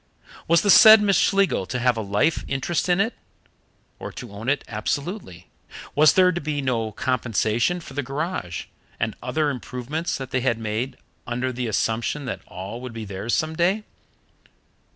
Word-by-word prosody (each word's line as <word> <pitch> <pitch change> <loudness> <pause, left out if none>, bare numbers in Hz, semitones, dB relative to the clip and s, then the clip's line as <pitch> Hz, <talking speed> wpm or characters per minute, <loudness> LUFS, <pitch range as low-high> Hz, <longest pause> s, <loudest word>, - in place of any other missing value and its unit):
Was 170 0 +5
the 205 - +5
said 220 +1 +10
Miss 200 -2 +3
Schlegel 195 - +2
to 125 - -3
have 125 0 +2
a 110 - -2
life 105 +11 +1
interest 150 +6 -1
in 175 +1 +3
it, 225 +4 +1 0.9
or - - -6
to 120 -4 -9
own 105 +5 -4
it 140 -1 +1
absolutely? 115 - -4 0.4
Was 155 +1 +6
there 185 -1 +5
to 175 - -3
be 150 0 -2
no 120 -5 -1
compensation 120 - 0
for 160 - -11
the 145 - -1
garage 140 - -4 0.3
and - - -1
other 155 -2 0
improvements 130 +5 -4
that 130 -2 -7
they 130 - 0
had 120 -3 +1
made 115 +4 -3 0.3
under 125 +2 -2
the 125 0 -3
assumption 115 +6 -1
that 125 - -4
all 95 +6 -7
would 125 -2 -7
be 115 -1 -6
theirs 100 +4 -2
some 155 0 -1
day? 185 +6 +1
130 Hz, 170 wpm, -23 LUFS, 115-160 Hz, 0.9 s, said